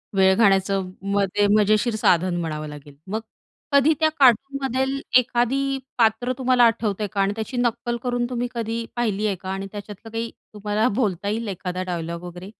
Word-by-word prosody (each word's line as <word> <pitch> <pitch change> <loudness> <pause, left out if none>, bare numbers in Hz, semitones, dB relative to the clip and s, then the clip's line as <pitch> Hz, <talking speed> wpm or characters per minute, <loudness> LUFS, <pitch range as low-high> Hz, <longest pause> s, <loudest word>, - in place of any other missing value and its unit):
वेळ 190 0 +5
घालवण्याचं 195 -3 +2 0.2
मग 200 -1 +3
ते 205 0 +4
मजेशीर 215 +2 +2
साधन 180 -3 +2
म्हणावं 155 -2 -4
लागेल. 145 -1 -11
मग 215 +3 -2 0.5
कधी 280 +3 +5
त्या 315 0 +4
कार्टूनमधेल 270 +1 +2 0.2
एखादी 265 +3 +1 0.2
पात्र 230 +2 +2
तुम्हाला 255 -1 +3
आठवतंय 215 -3 +1
का? 195 0 -2
आणि 195 +1 +1
त्याची 225 +3 -5
नक्कल 240 0 0
करून 245 -1 0
तुम्ही 245 0 -2
कधी 230 0 -3
पाहिली 215 -3 0
आहे 195 - 0
का? 185 +1 -9
आणि 195 +1 -3
त्याच्यातलं 210 +1 -9
काही 230 0 -3 0.2
तुम्हाला 210 +2 0
बोलता 200 -2 -1
येईल, 225 +1 -2
एखादा 185 -1 -4
डायलॉग 170 -1 -4
वगैरे? 180 +2 -8
215 Hz, 165 wpm, -23 LUFS, 190-240 Hz, 0.5 s, वेळ